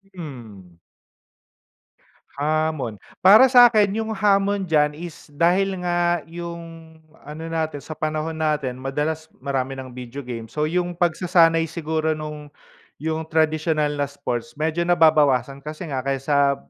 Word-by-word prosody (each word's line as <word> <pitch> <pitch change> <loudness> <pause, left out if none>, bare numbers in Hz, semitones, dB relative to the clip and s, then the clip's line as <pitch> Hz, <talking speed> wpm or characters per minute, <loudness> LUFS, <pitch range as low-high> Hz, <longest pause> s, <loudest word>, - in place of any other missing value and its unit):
Hmm. 110 - -10 1.6
Hamon, 155 -6 -1 0.2
para 215 +8 +7
sakin 235 -5 +6
yung 220 0 -3
hamon 200 0 +2
dyan 150 -3 +2
is, 170 0 -10
dahil 185 +4 +2
nga, 175 -2 +1
yung 165 -1 -9 0.3
ano 155 +2 -7
natin, 160 -3 -2
sa 155 - -10
panahon 155 +1 -3
natin 145 -5 -1
madalas 150 +4 -3 0.2
marami 135 -1 -2
ng 130 -1 -8
video 125 +2 -8
game, 115 -2 -6
so, 150 +6 -3
yung 175 +1 -1
pagsasanay 165 -1 +3
siguro 160 -1 -2
nung, 150 -1 -7 0.5
yung 160 0 -2
tradisyonal 155 -1 +1
na 145 - +2
sports 140 -1 -5
medyo 160 +3 -1
nababawasan 145 -6 +3
kasi 155 +4 -7
nga, 130 - -1
kaysa, 140 +1 +1
155 Hz, 125 wpm, -22 LUFS, 140-170 Hz, 1.6 s, para